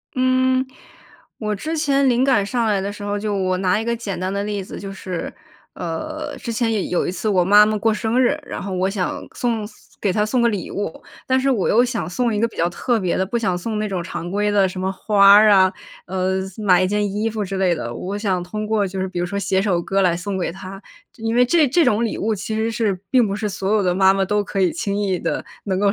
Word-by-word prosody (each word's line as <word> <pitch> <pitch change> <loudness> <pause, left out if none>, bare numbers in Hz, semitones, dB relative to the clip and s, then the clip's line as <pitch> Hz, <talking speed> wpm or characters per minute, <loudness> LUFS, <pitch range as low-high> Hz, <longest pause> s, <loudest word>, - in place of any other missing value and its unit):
嗯， 255 0 +2 0.7
我 210 -1 -2
之 315 +11 -4
前 280 -3 +2
灵 250 +1 +3
感 255 -7 +3
上 235 +3 -1
来 205 -3 +1
的 200 +1 -3
时 205 0 -10
候， 205 0 -2
就 210 0 -2
我 185 -1 0
拿 185 +1 +1
一 - - -4
个 235 - 0
简 210 -6 -5
单 185 +1 -2
的 200 0 -1
例 205 -2 -3
子， - - -8
就 195 -1 -6
是， 185 -2 -5 0.4
呃， 300 - -5
之 235 - -6
前 230 0 0
有 215 - 0 0.2
有 - - -2
一 - - -1
次 215 - -3
我 185 -3 +3
妈 205 +3 +7
妈 215 0 0
过 220 +2 +2
生 225 +3 0
日， 285 +4 +2
然 - - -6
后 195 - -5
我 185 +1 +1
想 195 -2 -3
送 230 -4 -1 0.3
给 200 - +1
她 210 +2 +1
送 245 +3 0
个 235 - +4
礼 205 -5 -3
物。 200 -5 -5 0.2
但 260 0 +2
是 270 +1 +1
我 225 -8 +1
又 240 +3 +4
想 245 -6 -3
送 235 +3 0
一 210 - 0
个 230 - +2
比 - - -17
较 170 - +1
特 235 +7 0
别 185 -4 -1
的， 190 - +1
不 235 +5 -1
想 190 -6 0
送 215 +4 -3
那 215 - -1
种 185 -3 -3
常 170 0 -6
规 205 +1 0
的 200 -2 +3
什 185 0 -6
么 190 0 -1
花 200 +1 +3
儿 215 +1 +7
啊， 190 -2 +6 0.4
呃， 190 +1 -1 0.2
买 185 -4 +3
一 - - +2
件 205 0 0
衣 215 +2 -1
服 215 -1 -3
之 195 0 -4
类 180 -3 +2
的。 120 -6 -5
我 190 +10 -4
想 195 -4 -1
通 215 +4 -5
过 215 -2 +1
就 190 0 -6
是 190 - -1
比 180 -1 -5
如 175 - -1
说 200 +2 -3
写 190 -1 +1
首 190 -4 +1
歌 195 +3 0
来 180 -3 +2
送 190 +2 -4
给 180 - -1
她， 190 +2 -9 0.3
因 225 0 -2
为 245 - +5
这 300 +2 +3
这 325 +5 +3
种 215 +2 +2
礼 230 - -1
物 220 0 0
其 200 +2 -4
实 220 +1 0
是， 215 -4 0
并 250 -3 +4
不 200 - -2
是 210 0 -3
所 195 +1 -1
有 210 - +3
的 180 -2 +1
妈 190 +1 +5
妈 195 0 +1
都 210 +2 +1
可 200 0 -5
以 180 -3 +3
轻 200 +5 -2
易 195 -3 0
地 - - -2 0.2
能 190 -2 -1
够 200 0 +3
205 Hz, 285 characters per minute, -21 LUFS, 190-225 Hz, 0.7 s, 妈